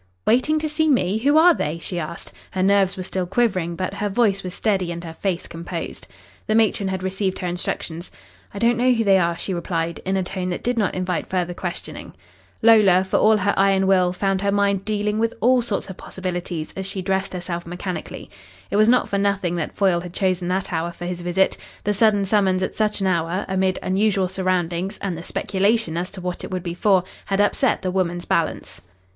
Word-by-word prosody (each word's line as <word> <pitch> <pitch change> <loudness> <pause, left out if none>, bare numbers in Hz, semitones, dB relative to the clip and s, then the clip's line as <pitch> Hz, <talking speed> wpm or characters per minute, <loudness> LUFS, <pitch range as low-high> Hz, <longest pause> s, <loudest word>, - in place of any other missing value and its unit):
"Waiting 255 +7 +3
to 310 0 -1
see 310 +1 +1
me? 215 -6 +2
Who 285 +6 +3
are 345 +2 +7
they?" 155 - -2
she 175 +1 -4
asked. 165 +1 -6 0.2
Her 185 - -1
nerves 195 0 +3
were 185 - -4
still 185 -1 -3
quivering, 185 -5 0
but 185 +2 -3
her 205 +1 -2
voice 200 -2 +2
was 180 +1 -6
steady 190 -5 0
and 170 0 -6
her 165 -1 -7
face 180 +1 -2
composed. 170 0 -6 0.4
The 215 - +1
matron 215 -3 +2
had 190 -1 -3
received 190 0 -1
her 185 - -5
instructions. 175 -1 -4 0.4
"I - - -9
don't 235 +2 +2
know 255 +1 +4
who 230 -1 +1
they 195 -2 +5
are," 170 -1 0
she 190 - -3
replied, 170 -1 -2
in 190 +1 0
a 190 - 0
tone 185 0 -4
that 175 - -4
did 245 +1 0
not 210 -5 0
invite 180 -1 -2
further 180 -1 -1
questioning. 175 0 -6 0.5
Lola, 210 -5 +6
for 190 - 0
all 215 0 +5
her 200 0 +1
iron 195 0 +3
will, 185 -2 +3
found 195 +1 -1
her 200 0 +1
mind 200 -1 +1
dealing 210 0 -1
with 230 0 0
all 250 +2 +4
sorts 225 -4 -3
of 190 -2 -8
possibilities 175 -3 -5
as 190 0 -4
she 190 -1 -4
dressed 190 0 -1
herself 175 -1 -5
mechanically. 180 +1 -6 0.4
It 200 - +1
was 215 +1 +5
not 250 +1 +4
for 200 - -1
nothing 200 -3 0
that 160 - -4
Foyle 190 -4 +2
had 175 -1 -9
chosen 185 -2 0
that 185 +1 -1
hour 165 +1 -1
for 175 - -8
his 175 0 -4
visit. 175 +2 +1 0.3
The 205 - +1
sudden 205 -1 +3
summons 190 -2 +2
at - - -3
such 215 -1 0
an - - +1
hour, 175 +1 0
amid 190 -1 +1
unusual 195 -1 +1
surroundings 185 0 -1
and 190 -3 -3
the 165 - -7
speculation 200 -1 0
as 175 +2 -2
to 190 - -9
what 180 0 -4
it - - -6
would 185 -2 -3
be 170 -2 -3
for, 190 0 +3 0.2
had 195 -1 0
upset 205 0 +2
the 185 - -1
woman's 175 -2 -1
balance. - - -1
190 Hz, 215 wpm, -22 LUFS, 180-205 Hz, 0.5 s, are